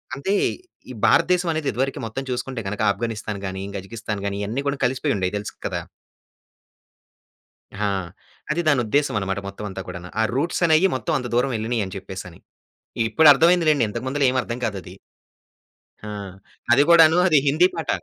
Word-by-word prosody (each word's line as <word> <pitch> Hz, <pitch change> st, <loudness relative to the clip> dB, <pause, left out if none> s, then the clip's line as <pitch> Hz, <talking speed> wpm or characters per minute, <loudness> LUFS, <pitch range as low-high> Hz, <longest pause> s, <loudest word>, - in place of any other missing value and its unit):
అంటే 190 Hz, +9 st, -2 dB, 0.6 s
ఈ -, -, -7 dB
భారతదేశం 175 Hz, +1 st, +3 dB
అనేది 155 Hz, -2 st, -2 dB
ఇదివరకు 135 Hz, +2 st, -2 dB
మొత్తం 125 Hz, +5 st, -5 dB
చూసుకుంటే 125 Hz, 0 st, -3 dB
గనుక 105 Hz, +2 st, -4 dB
ఆఫ్ఘనిస్తాన్ 110 Hz, -1 st, -4 dB
కానీ, 95 Hz, 0 st, -5 dB, 0.2 s
కజికిస్థాన్ 105 Hz, +1 st, -6 dB
గాని, 100 Hz, 0 st, -3 dB
ఇయన్నీ 115 Hz, +7 st, -2 dB
కూడా 140 Hz, 0 st, -1 dB
కలిసిపోయి 130 Hz, +1 st, 0 dB
ఉండేవి. 95 Hz, +1 st, -1 dB
తెలుసు 105 Hz, -, -6 dB
కదా! -, -, -3 dB, 2.0 s
ఆ! 105 Hz, 0 st, 0 dB, 0.6 s
అది 160 Hz, +3 st, +1 dB
దాని 140 Hz, -4 st, +4 dB
ఉద్దేశం 145 Hz, +5 st, +1 dB
అన్నమాట, 95 Hz, 0 st, -2 dB
మొత్తం 100 Hz, +2 st, -8 dB
అంతా 95 Hz, 0 st, -6 dB
కూడాను. 90 Hz, -1 st, -8 dB
ఆ -, -, +4 dB
రూట్స్ 165 Hz, +6 st, -1 dB
అనేయి 160 Hz, +3 st, +4 dB
మొత్తం 160 Hz, +5 st, -3 dB
అంత 125 Hz, -, -5 dB
దూరం 125 Hz, +2 st, +2 dB
ఎళ్ళినియ్యి 110 Hz, -1 st, -1 dB
అని 95 Hz, -, -8 dB
చెప్పేసని. 95 Hz, -2 st, -8 dB, 0.7 s
ఇప్పుడు 155 Hz, +7 st, +5 dB
అర్థమైంది 170 Hz, +3 st, +3 dB
లెండి 145 Hz, -6 st, +3 dB
ఇంతకు 105 Hz, -, -5 dB
ముందుల 145 Hz, +1 st, -1 dB
ఏమి 130 Hz, 0 st, +1 dB
అర్థం 115 Hz, +1 st, -5 dB
కాదది. 95 Hz, -4 st, -5 dB, 1.1 s
ఆ! -, -, -6 dB, 0.6 s
అది 135 Hz, +4 st, +6 dB
కూడాను 165 Hz, -1 st, +7 dB
అది 155 Hz, -5 st, +5 dB
హిందీ 155 Hz, +6 st, +4 dB
పాట. 165 Hz, -, -5 dB
125 Hz, 165 wpm, -22 LUFS, 100-150 Hz, 2.0 s, కూడాను